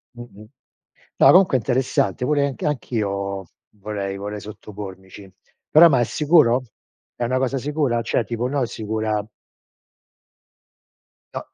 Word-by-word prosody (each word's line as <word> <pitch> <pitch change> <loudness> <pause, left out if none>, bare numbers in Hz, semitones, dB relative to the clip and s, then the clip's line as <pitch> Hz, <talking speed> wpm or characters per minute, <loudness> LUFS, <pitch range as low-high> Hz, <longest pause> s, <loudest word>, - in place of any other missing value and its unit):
Mh-mh. 120 -3 -12 0.7
No, - - +5
comunque 180 -7 +5
è - - 0
interessante. 125 -2 0
Pure 145 0 +2
anch 135 - -6
anch'io 100 - -2 0.3
vorrei 100 -1 -4
vorrei 105 +1 -6
sottopormici. 100 -2 -10 0.4
Però, 170 +2 +8
ma 135 -5 +3
è - - +3
sicuro? 145 -3 +3 0.5
È 120 - -3
una 130 +2 0
cosa 130 +1 -1
sicura? 140 -4 -1
Cioè, 115 0 0
tipo, 120 +3 -3
no 135 -1 0
sicura 110 -1 -3 2.1
No, - - -6
115 Hz, 125 wpm, -22 LUFS, 105-135 Hz, 2.1 s, Però